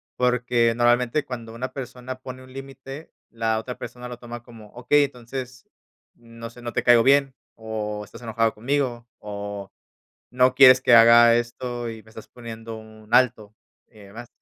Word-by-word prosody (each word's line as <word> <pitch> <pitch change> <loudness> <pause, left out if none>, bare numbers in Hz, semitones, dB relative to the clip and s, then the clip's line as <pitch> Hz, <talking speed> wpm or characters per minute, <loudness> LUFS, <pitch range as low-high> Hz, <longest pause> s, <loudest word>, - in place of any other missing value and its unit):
porque 125 -2 +1
normalmente, 120 +4 +2
cuando 115 -3 -8
una 125 +3 -6
persona 130 -1 -7
pone 130 0 -9
un 130 0 -16
límite, 135 +2 -10 0.2
la 115 -1 -1
otra 125 +2 -7
persona 125 0 -8
lo 125 -1 -8
toma 120 -1 -9
como, 115 -3 -14
okey, 125 +4 +2
entonces, 125 -1 -8 0.5
no 115 0 -11
sé, 120 +1 -15
no 120 -1 -6
te - - -1
caigo 120 -2 +6
bien, 135 -1 +3 0.2
o 105 -2 -5
estás 115 +4 -14
enojado 115 -1 0
conmigo, 120 0 -2
o 100 -1 -7 0.6
no 125 +1 +3
quieres 130 -1 +8
que 125 - +3
haga 115 0 +7
esto 120 0 -3
y 110 -1 -9
me 110 - -20
estás 110 0 -12
poniendo 115 -1 -9
un 110 -1 -15
alto, 110 -4 +2 0.3
y 110 - -20
demás. 105 +4 -11
120 Hz, 165 wpm, -23 LUFS, 115-125 Hz, 0.6 s, quieres